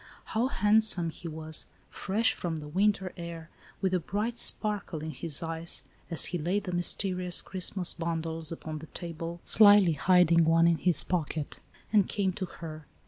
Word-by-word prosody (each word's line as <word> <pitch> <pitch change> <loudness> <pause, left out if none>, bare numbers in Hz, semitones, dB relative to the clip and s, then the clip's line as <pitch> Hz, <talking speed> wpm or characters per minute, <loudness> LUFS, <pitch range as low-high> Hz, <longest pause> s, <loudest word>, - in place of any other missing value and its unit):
How 230 +3 +1
handsome 210 -7 +4
he 170 - -10
was, 160 0 -2 0.2
fresh 210 +4 0
from 170 -2 -4
the 150 -1 -7
winter 190 +3 0
air, 170 -1 -8 0.3
with 190 -2 0
a 180 - +2
bright 215 +7 -3
sparkle 205 -7 0
in 160 - -4
his 160 -1 -3
eyes, 165 +1 -3 0.3
as 165 - +2
he 175 - -2
laid 180 +6 -1
the 180 - -5
mysterious 180 0 0
Christmas 185 -1 0
bundles 165 -1 -4
upon 155 -1 -6
the 160 - -11
table, 170 +1 -7
slyly 205 -5 +6
hiding 170 +1 +4
one 165 +1 +4
in 170 -2 +3
his 180 +2 +2
pocket, 160 -4 -3 0.3
and 205 -3 +4
came 195 -2 -1
to 185 -1 -4
her. 155 -3 -10
170 Hz, 165 wpm, -29 LUFS, 165-190 Hz, 0.3 s, slyly